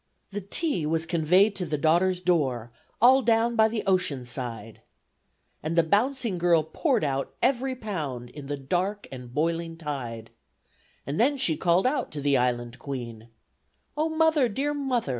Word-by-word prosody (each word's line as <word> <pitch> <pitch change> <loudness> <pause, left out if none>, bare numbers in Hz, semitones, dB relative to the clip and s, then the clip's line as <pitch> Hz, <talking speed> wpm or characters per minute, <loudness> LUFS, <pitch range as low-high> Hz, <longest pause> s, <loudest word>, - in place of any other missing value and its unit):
The 205 +1 -4
tea 200 - -1
was 160 +1 0
conveyed 180 +5 +3
to 180 - -2
the 150 0 -1
daughter's 175 +4 +2
door, 135 -10 0 0.3
All 260 +4 +6
down 230 0 +2
by 220 -1 +5
the 220 -1 -3
ocean 180 -9 0
side, 115 -3 -5 0.8
And 160 +2 -3
the 170 - +5
bouncing 220 - +1
girl 170 -2 +3
poured 255 - 0
out 135 -2 -2
every 260 +1 +1
pound 150 - -5
In 145 0 -9
the 145 0 -3
dark 180 +9 -2
and 125 -2 -9
boiling 165 +3 -1
tide, 125 -8 -6 0.7
And 140 +3 -3
then 280 +5 +3
she 175 -12 +2
called 175 +2 +2
out 260 0 0
to 150 - -4
the 140 0 +2
Island 120 -1 -1
Queen, 120 -5 -7 0.7
"Oh! 310 +2 0
Mother! 315 -5 +3
Dear 280 +7 -1
Mother!" 265 - -1
170 Hz, 160 wpm, -26 LUFS, 140-230 Hz, 0.8 s, All